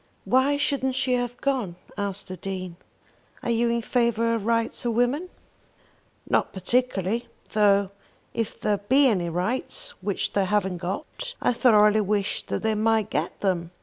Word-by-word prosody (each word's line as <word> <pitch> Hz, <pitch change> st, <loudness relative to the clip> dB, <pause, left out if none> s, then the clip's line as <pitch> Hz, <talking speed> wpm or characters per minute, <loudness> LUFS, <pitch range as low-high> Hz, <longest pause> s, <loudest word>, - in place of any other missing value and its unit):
"Why 270 Hz, +3 st, +3 dB
shouldn't 275 Hz, -2 st, 0 dB
she 260 Hz, -1 st, +1 dB
have 245 Hz, -1 st, -1 dB
gone?" 255 Hz, -11 st, -1 dB, 0.2 s
asked 200 Hz, -1 st, -3 dB
the 185 Hz, -, -6 dB
Dean. 185 Hz, -1 st, -5 dB, 0.7 s
"Are 235 Hz, -, 0 dB
you 235 Hz, +1 st, +2 dB
in 235 Hz, 0 st, 0 dB
favour 230 Hz, -1 st, +1 dB
of 225 Hz, -2 st, -2 dB
rights 230 Hz, 0 st, 0 dB
of 235 Hz, -2 st, 0 dB
women?" 265 Hz, +9 st, +1 dB, 1.0 s
"Not -, -, +1 dB
particularly; 225 Hz, +1 st, 0 dB, 0.2 s
though 200 Hz, -2 st, +3 dB, 0.4 s
if 225 Hz, -1 st, -3 dB
there 210 Hz, -1 st, +1 dB
be 265 Hz, +8 st, +4 dB
any 185 Hz, -9 st, +2 dB
rights 250 Hz, -, -2 dB
which 200 Hz, -2 st, -2 dB
they 200 Hz, -1 st, +2 dB
haven't 190 Hz, -3 st, 0 dB
got, 195 Hz, -, -5 dB
I -, -, +2 dB
thoroughly 215 Hz, -3 st, +5 dB
wish 205 Hz, -1 st, 0 dB
that -, -, -3 dB
they 220 Hz, 0 st, +2 dB
might 220 Hz, 0 st, +1 dB
get -, -, -2 dB
them. 175 Hz, -4 st, 0 dB
220 Hz, 155 wpm, -25 LUFS, 195-245 Hz, 1.0 s, thoroughly